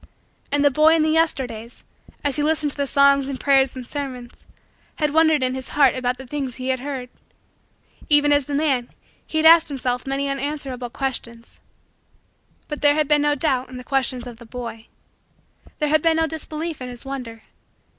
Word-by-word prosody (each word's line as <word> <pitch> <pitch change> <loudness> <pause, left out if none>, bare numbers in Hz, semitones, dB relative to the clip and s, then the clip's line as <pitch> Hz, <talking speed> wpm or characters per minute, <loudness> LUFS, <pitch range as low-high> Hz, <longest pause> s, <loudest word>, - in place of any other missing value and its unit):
And 290 0 +2
the 285 - +5
boy 310 +4 +5
in 320 - +2
the 310 - +2
Yesterdays, 250 -8 -1 0.4
as 285 -2 +1
he 295 - 0
listened 300 -1 +1
to - - -14
the 280 -1 -1
songs 280 0 +4
and 265 -2 -5
prayers 270 -2 +3
and 255 -1 -7
sermons, 255 -3 -7 0.5
had 300 -2 -1
wondered 315 -3 +4
in 255 0 +1
his 260 0 -6
heart 275 -4 +6
about 250 -1 -2
the 265 - -10
things 265 -2 -4
he 260 0 -2
heard 260 0 -4 1.0
even 290 -1 +5
as 285 -2 +1
the 285 - -2
man, 275 -5 0 0.4
he 315 - -3
had 315 - +2
asked 330 0 +8
himself 255 -3 -3
many 275 +1 -1
unanswerable 275 -3 -4
questions... 235 -3 -5 1.1
But 295 - -6
there 290 0 +5
had 305 -1 +1
been 295 0 +3
no 295 0 +2
doubt 265 -3 -1
in 255 - -9
the 250 - -8
questions 260 -2 -1
of 240 -2 -10
the 235 - -12
boy. 230 -2 -7 0.9
There 300 -2 0
had 310 0 +3
been 325 0 +2
no 325 - +2
disbelief 320 -1 -5
in 250 - -5
his 245 +1 -10
wonder. 250 -5 -7
275 Hz, 190 wpm, -22 LUFS, 250-295 Hz, 1.1 s, asked